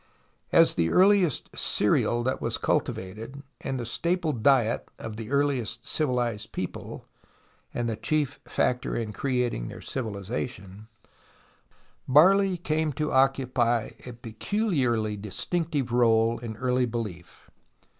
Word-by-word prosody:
As -, -, +6 dB
the 80 Hz, -1 st, +1 dB
earliest 185 Hz, -5 st, +3 dB
cereal 120 Hz, 0 st, +2 dB
that 130 Hz, +2 st, -1 dB
was -, -, -1 dB
cultivated 110 Hz, +9 st, -2 dB, 0.2 s
and 135 Hz, -1 st, -3 dB
the 120 Hz, -, -4 dB
staple 170 Hz, +6 st, 0 dB
diet 120 Hz, -1 st, +2 dB
of 110 Hz, -, -7 dB
the 110 Hz, 0 st, -7 dB
earliest 130 Hz, -5 st, 0 dB
civilized 120 Hz, -8 st, -1 dB
people -, -, -6 dB, 0.3 s
— -, -, -36 dB
and 120 Hz, -1 st, -2 dB
the 115 Hz, -, -1 dB
chief 145 Hz, +4 st, -1 dB
factor 125 Hz, 0 st, 0 dB
in 110 Hz, -2 st, -3 dB
creating 125 Hz, -, -1 dB
their -, -, -8 dB
civilization 105 Hz, -3 st, -5 dB, 0.6 s
— -, -, -33 dB, 0.5 s
barley: 185 Hz, +7 st, +5 dB
came 160 Hz, -2 st, 0 dB
to 150 Hz, +3 st, -2 dB
occupy 130 Hz, -3 st, +2 dB, 0.2 s
a 125 Hz, -, -6 dB
peculiarly 120 Hz, -, -1 dB
distinctive 135 Hz, -, -2 dB
role 115 Hz, -1 st, +3 dB
in 115 Hz, -2 st, -7 dB
early 125 Hz, +1 st, +1 dB
belief. 105 Hz, -7 st, -7 dB
125 Hz, 125 wpm, -27 LUFS, 110-140 Hz, 0.6 s, As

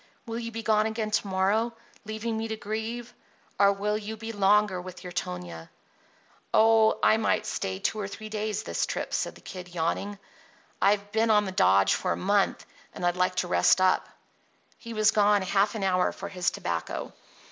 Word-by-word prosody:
Will 230 Hz, -1 st, -4 dB
you 230 Hz, -1 st, -5 dB
be 225 Hz, 0 st, -5 dB
gone 215 Hz, 0 st, +3 dB
again 220 Hz, -1 st, -3 dB
to 210 Hz, -1 st, 0 dB
morrow, 200 Hz, +5 st, +1 dB, 0.3 s
leaving 220 Hz, +1 st, -3 dB
me 220 Hz, 0 st, -2 dB
to 220 Hz, -, -3 dB
grieve, 220 Hz, +2 st, -5 dB, 0.5 s
or 200 Hz, 0 st, +6 dB
will 210 Hz, +2 st, -1 dB
you 220 Hz, +1 st, -6 dB
be 225 Hz, +1 st, -6 dB
longer 205 Hz, -2 st, +3 dB
with 185 Hz, +1 st, -10 dB
your 180 Hz, -, -7 dB
Tonia?" 85 Hz, -, -5 dB, 0.8 s
"Oh, 220 Hz, 0 st, +5 dB
I 220 Hz, -, +5 dB
might 225 Hz, -, +1 dB
stay 95 Hz, 0 st, -3 dB
two 215 Hz, -, -2 dB
or 200 Hz, -, -3 dB
three 215 Hz, +2 st, -8 dB
days 215 Hz, -1 st, -3 dB
this -, -, -1 dB
trip," -, -, -4 dB
said -, -, -1 dB
the -, -, -15 dB
Kid, 180 Hz, -1 st, -9 dB
yawning. 185 Hz, +5 st, -2 dB, 0.6 s
"I've 205 Hz, 0 st, +2 dB
been 225 Hz, +1 st, +2 dB
on 210 Hz, -1 st, +4 dB
the 190 Hz, -, -4 dB
dodge 95 Hz, -, +4 dB
for 180 Hz, -, 0 dB
a -, -, -5 dB
month, 200 Hz, +1 st, +1 dB, 0.3 s
and 175 Hz, -, -3 dB
I'd 175 Hz, 0 st, +2 dB
like 180 Hz, 0 st, +1 dB
to 180 Hz, -, 0 dB
rest 175 Hz, -, +4 dB
up." 185 Hz, 0 st, +2 dB, 0.7 s
He 230 Hz, -, -9 dB
was 215 Hz, 0 st, +4 dB
gone 205 Hz, -1 st, +3 dB
half 195 Hz, +3 st, +1 dB
an 210 Hz, -, -3 dB
hour 185 Hz, -1 st, +2 dB
for 195 Hz, -, -7 dB
his 180 Hz, -3 st, 0 dB
tobacco. 85 Hz, -1 st, -4 dB
205 Hz, 190 wpm, -27 LUFS, 185-220 Hz, 0.8 s, or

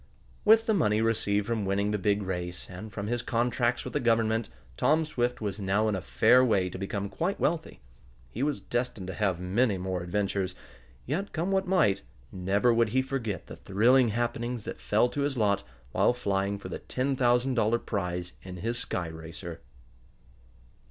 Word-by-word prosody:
With 225 Hz, +1 st, +6 dB
the 220 Hz, -, +2 dB
money 110 Hz, -, +2 dB
received 105 Hz, -2 st, +1 dB
from 115 Hz, -1 st, -1 dB
winning 100 Hz, +2 st, 0 dB
the 105 Hz, -, 0 dB
big 100 Hz, +1 st, +1 dB
race, 90 Hz, -2 st, -4 dB
and 100 Hz, +4 st, -8 dB
from 100 Hz, -1 st, -4 dB
his 120 Hz, +2 st, -1 dB
contracts 120 Hz, +1 st, 0 dB
from -, -, -6 dB
the -, -, 0 dB
Government, 115 Hz, -1 st, +2 dB, 0.3 s
Tom 155 Hz, -, +3 dB
Swift 125 Hz, -6 st, -1 dB
was 105 Hz, -2 st, -3 dB
now 100 Hz, +2 st, +1 dB
in 105 Hz, -, +1 dB
a 95 Hz, -, -3 dB
fair 70 Hz, -, +5 dB
way 95 Hz, -7 st, +2 dB
to 95 Hz, -, -7 dB
become 100 Hz, +1 st, -3 dB
quite 170 Hz, -, -2 dB
wealthy. 160 Hz, -, -1 dB, 0.5 s
He 120 Hz, -, -5 dB
was 145 Hz, 0 st, 0 dB
destined 120 Hz, -5 st, -2 dB
to -, -, -3 dB
have 95 Hz, -3 st, 0 dB
many 100 Hz, +4 st, +1 dB
more 90 Hz, -1 st, -3 dB
adventures; 95 Hz, 0 st, -1 dB, 0.5 s
yet, 180 Hz, +10 st, -2 dB
come 170 Hz, +4 st, -1 dB
what 190 Hz, -1 st, +1 dB
might, 115 Hz, -, +3 dB, 0.3 s
never 100 Hz, +6 st, +2 dB
would 115 Hz, -1 st, +3 dB
he 130 Hz, +4 st, +2 dB
forget 120 Hz, -, -3 dB
the -, -, -9 dB
thrilling 115 Hz, +8 st, +4 dB
happenings 120 Hz, +1 st, -2 dB
that -, -, -6 dB
fell 110 Hz, +4 st, +3 dB
to 145 Hz, -, -3 dB
his 140 Hz, -2 st, 0 dB
lot 100 Hz, -3 st, +2 dB, 0.3 s
while -, -, +3 dB
flying 100 Hz, -4 st, -1 dB
for 95 Hz, -2 st, -8 dB
the -, -, -5 dB
ten 135 Hz, +2 st, -1 dB
thousand 125 Hz, +1 st, +2 dB
dollar 115 Hz, -1 st, +2 dB
prize 90 Hz, -5 st, -3 dB
in 90 Hz, -1 st, -8 dB
his 115 Hz, +6 st, -2 dB
sky 90 Hz, -7 st, -3 dB
racer. 80 Hz, +1 st, -8 dB
110 Hz, 185 wpm, -28 LUFS, 95-125 Hz, 0.5 s, With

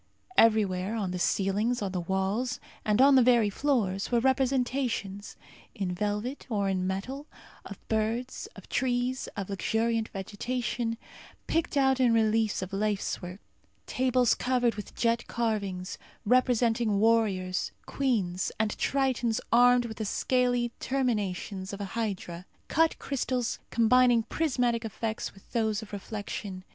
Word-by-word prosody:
Everywhere 210 Hz, -2 st, +3 dB
on 200 Hz, -5 st, -2 dB
the 180 Hz, -, -3 dB
ceilings, 205 Hz, +7 st, +1 dB
on 195 Hz, -, -2 dB
the 185 Hz, -, -2 dB
walls, 190 Hz, +7 st, -1 dB, 0.2 s
and 210 Hz, +1 st, +1 dB
on 275 Hz, +2 st, +7 dB
the 265 Hz, -, +7 dB
very 235 Hz, -4 st, +4 dB
floors 210 Hz, -7 st, 0 dB
were 240 Hz, -, +4 dB
representations, 255 Hz, -5 st, 0 dB, 0.4 s
in 190 Hz, -3 st, -2 dB
velvet 210 Hz, +8 st, -3 dB
or 205 Hz, -4 st, 0 dB
in 185 Hz, -1 st, 0 dB
metal, 255 Hz, +10 st, -4 dB, 0.4 s
of -, -, -8 dB
birds, 230 Hz, -, -1 dB
of -, -, -13 dB
trees; 250 Hz, 0 st, -1 dB
of 200 Hz, -2 st, -3 dB
luxuriant 225 Hz, +3 st, 0 dB
vegetation, 230 Hz, +3 st, -3 dB, 0.5 s
picked 325 Hz, -2 st, 0 dB
out 265 Hz, -1 st, +3 dB
in 245 Hz, -3 st, +4 dB
reliefs 220 Hz, -2 st, +2 dB
of 185 Hz, +2 st, -8 dB
lacework; 195 Hz, -2 st, -2 dB, 0.5 s
tables 250 Hz, -2 st, +2 dB
covered 245 Hz, -2 st, +1 dB
with 210 Hz, -, -8 dB
jet 235 Hz, 0 st, +1 dB
carvings, 200 Hz, -6 st, -2 dB, 0.3 s
representing 235 Hz, -2 st, +3 dB
warriors, 205 Hz, -5 st, +1 dB
queens, 200 Hz, -10 st, -1 dB
and 215 Hz, -1 st, 0 dB
tritons 255 Hz, -4 st, +1 dB
armed 245 Hz, 0 st, +6 dB
with 220 Hz, -2 st, -7 dB
the 220 Hz, -, -3 dB
scaly 245 Hz, +2 st, +1 dB
terminations 205 Hz, -7 st, -2 dB
of 200 Hz, -, -6 dB
a 200 Hz, -, -3 dB
hydra. 190 Hz, -6 st, -4 dB, 0.2 s
Cut 325 Hz, +1 st, +2 dB
crystals 255 Hz, -3 st, -2 dB
combining 240 Hz, 0 st, +4 dB
prismatic 245 Hz, -4 st, 0 dB
effects 220 Hz, -1 st, -4 dB
with 195 Hz, -, -19 dB
those 220 Hz, -2 st, 0 dB
of 210 Hz, -, -13 dB
reflection. 200 Hz, -2 st, -5 dB
225 Hz, 130 wpm, -28 LUFS, 200-250 Hz, 0.5 s, on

